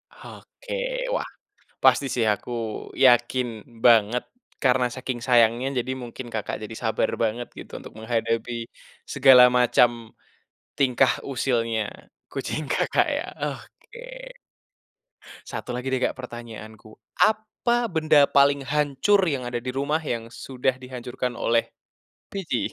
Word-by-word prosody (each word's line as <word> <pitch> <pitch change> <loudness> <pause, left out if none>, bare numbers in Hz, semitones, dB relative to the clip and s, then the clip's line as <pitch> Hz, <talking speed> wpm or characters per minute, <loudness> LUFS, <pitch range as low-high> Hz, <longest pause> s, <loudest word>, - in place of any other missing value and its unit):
Oke, - - -11 0.4
wah - - -1 0.6
pasti 140 - +5
sih 120 -3 +1
aku 105 +4 -9 0.5
yakin 125 0 +4 0.4
banget, 115 0 +5 0.4
karena 125 -1 +3
saking 130 -1 -4
sayangnya 120 0 +4 0.2
jadi 130 - -3
mungkin 120 +1 -8
Kakak 110 -2 -3
jadi 110 +1 -7
sabar 110 -1 +1
banget 115 +2 -2
gitu, - - -11
untuk - - -12
menghadapi 115 +1 -1 0.6
segala 130 -2 +8
macam 125 0 +5 0.9
tingkah 130 -3 +3 0.2
usilnya 115 -4 0 0.5
kucing 155 - -3
Kakak - - +2
ya. - - -4 0.2
Oke. - - -9 1.1
1 - - -5
lagi 125 +2 -4
deh, 130 -1 0
Kak, - - +2
pertanyaanku. 110 -3 -9 0.3
Apa 220 +2 +1
benda 155 -5 +4
paling 140 -1 +3
hancur 150 +7 +2
yang 130 -3 -3
ada 120 -1 -4
di 125 - -3
rumah, 140 +4 -1
yang 115 -6 -3
sudah 130 +2 -2
dihancurkan 125 -1 -5
oleh 115 0 +1 0.6
Pici? 165 - -2
125 Hz, 120 wpm, -24 LUFS, 120-140 Hz, 1.1 s, segala